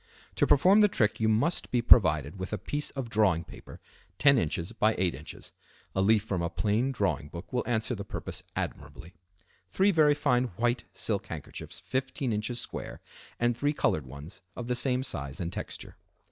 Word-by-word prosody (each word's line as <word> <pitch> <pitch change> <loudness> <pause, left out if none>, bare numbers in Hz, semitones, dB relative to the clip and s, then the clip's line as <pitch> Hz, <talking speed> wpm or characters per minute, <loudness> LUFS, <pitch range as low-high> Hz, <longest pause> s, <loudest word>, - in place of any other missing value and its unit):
To - - +3
perform 185 +9 +6
the 210 - +7
trick 110 - +1
you 110 -1 +2
must 115 +11 +1
be 125 - +1
provided 80 - +5
with 95 - -5
a 105 - -1
piece 145 +9 -3
of 135 -3 -5
drawing 105 -7 +2
paper - - -12 0.4
10 140 -3 +5
in. 80 - 0 0.3
by 110 +1 +3
8 90 -2 +1
in. - - -10 0.7
(a 95 - +1
leaf 105 +1 +4
from 95 -5 -2
a 85 - -1
plain 110 +8 0
drawing 100 - -1
book 85 +8 -9
will 125 - +1
answer 120 0 0
the 100 -3 -5
purpose - - -6
admirably), 75 +4 -6 0.6
three 195 - +3
very 150 -4 +4
fine 125 -3 +2
white 120 +1 0
silk 105 -2 -1
handkerchiefs 80 -4 -8
15 130 -1 -2
in. 105 - 0
square, 120 +3 -5 0.4
and 120 0 +2
three 145 +5 0
colored 75 - 0
ones 70 +7 -10
of 120 - -6
the 125 - 0
same 125 +1 +1
size 70 - -5
and 85 -1 -3
texture. - - -7
110 Hz, 185 wpm, -29 LUFS, 90-130 Hz, 0.7 s, the